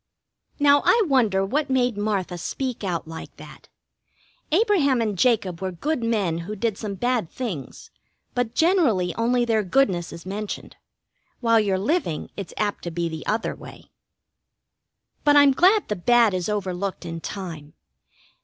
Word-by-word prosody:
Now 285 -1 +5
I 465 -2 +4
wonder 225 - +2
what 285 +8 -1
made 250 -3 +1
Martha 200 -4 -2
speak 255 +5 -4
out 175 -4 -2
like 160 0 -9
that? - - -13 0.8
Abraham 330 - +3
and 215 -3 -1
Jacob 195 -5 +1
were 190 -1 -2
good 260 - -2
men 200 -8 0
who 195 +6 -6
did 220 0 -1
some 205 -2 -5
bad 240 -4 0
things, 200 - -6 0.4
but 245 -2 -2
generally 285 - +2
only 240 +1 +1
their 225 -2 +2
goodness 190 -5 +1
is 170 - -10
mentioned. 205 +2 -6 0.6
While 230 -2 +4
you're 200 -3 +1
living 200 - -1
it's 200 -4 -6
apt 205 -1 -2
to - - -2
be 170 0 -2
the 160 -1 -6
other 220 +2 -1
way. - - -13 1.3
But 290 0 +5
I'm 285 -1 +7
glad 380 +9 +4
the 210 - -1
bad 230 +3 +4
is 185 +1 -2
overlooked 195 -2 -3
in 165 -1 -5
time. 165 -7 -7
215 Hz, 155 wpm, -24 LUFS, 185-255 Hz, 1.3 s, I'm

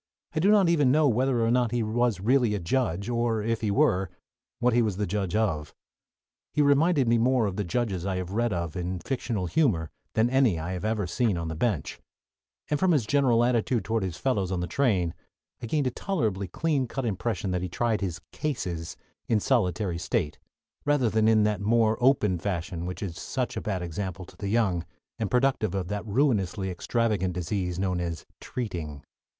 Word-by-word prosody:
I - - 0
do 190 +6 +3
not 205 -3 +5
even 150 -6 +4
know 150 +1 +4
whether 125 -1 +2
or 115 - +2
not 125 -1 +2
he 120 0 0
was 115 -2 +1
really 120 +1 +2
a - - -2
judge, 100 0 -1
or, 115 -2 0
if 115 0 -1
he 110 - 0
were, 95 -1 +2 0.5
what 125 0 +2
he 120 - +4
was 105 -5 0
a 105 - +1
judge 95 -1 -2
of. 90 -9 -1 0.8
He 150 - +4
reminded 145 -1 +3
me 115 0 +4
more 125 0 +3
of 100 -3 -2
the 105 - -1
judges 95 -1 -1
I 95 0 -1
have 90 0 -4
read 115 +3 0
of 85 -4 -3
in 90 +1 -2
fictional 115 -2 -2
humor 90 - +1 0.2
than 110 +1 +4
any 125 -7 +3
I 80 +3 -4
have 90 0 -4
ever 110 -2 0
seen 100 +2 0
on 85 -1 -3
the 80 - -4
bench, 90 - -1 0.7
and 150 - 0
from 185 -2 +3
his 135 -8 +2
general 120 -2 +3
attitude 120 -3 +1
toward 115 0 0
his 90 -3 -3
fellows 100 -5 0
on 90 - -1
the 90 - -1
train 90 -6 +1 0.5
I 115 - -4
gained 145 +4 0
a 130 - +1
tolerably 110 - -1
clean 140 - 0
cut 135 +2 -4
impression 110 -1 -2
that 90 -1 -1
he 90 - -3
tried 110 +3 0
his 90 -2 -3
"cases" 90 - -3 0.3
in 110 -3 +3
solitary 95 -7 0
state, 85 -4 -1 0.4
rather 145 -6 +2
than 110 0 +3
in 110 -1 +5
that 105 -2 0
more 110 +1 +3
open 105 -9 +3
fashion 85 -2 -3
which 90 +3 -5
is 90 -3 -5
such 130 -2 -3
a - - -3
bad 95 -4 -2
example 95 +1 -4
to - - -16
the 100 - -4
young, 100 -6 +1 0.4
and 110 -3 -1
productive 125 -6 +1
of 90 -2 -2
that 105 +1 -4
ruinously 100 -6 +1
extravagant 100 -1 0
disease 90 0 -2
known 90 -1 0
as 85 -2 -4
"treating." 85 - -5
105 Hz, 200 wpm, -27 LUFS, 90-120 Hz, 0.8 s, not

